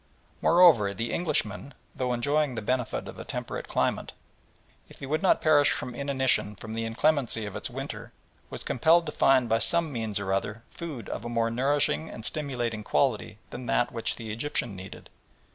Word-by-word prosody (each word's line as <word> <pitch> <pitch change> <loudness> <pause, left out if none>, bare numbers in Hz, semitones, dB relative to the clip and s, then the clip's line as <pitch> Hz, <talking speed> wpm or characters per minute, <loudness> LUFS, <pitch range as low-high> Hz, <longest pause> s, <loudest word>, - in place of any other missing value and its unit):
Moreover, 155 - +6
the 115 +4 -3
Englishman, 145 - -2 0.2
though 125 -1 -1
enjoying 145 +2 +1
the 115 - -3
benefit 125 +1 -1
of - - -9
a - - -5
temperate - - -5
climate, - - -1 0.8
if - - -15
he - - -7
would 155 +3 -1
not 190 - +3
perish 145 -2 +5
from 125 - -3
inanition 130 -5 +1
from 110 +2 -8
the 115 0 -2
inclemency 120 -1 +1
of 105 - -7
its - - -2
winter, - - -6 0.4
was - - -5
compelled 165 +7 +3
to 150 - -4
find 130 -4 +4
by 115 0 +2
some 170 +3 +2
means 110 -5 -2
or 95 -1 -1
other 100 +3 -2
food 155 -9 -7
of 100 - -5
a 120 - -5
more 115 -1 0
nourishing 130 - +1
and 110 - -7
stimulating 120 -7 -3
quality 110 -4 0
than 120 0 -7
that 120 - +1
which 115 -1 -1
the 110 -2 -6
Egyptian 120 -3 -1
needed. 95 +1 -10
120 Hz, 180 wpm, -27 LUFS, 110-145 Hz, 0.8 s, Moreover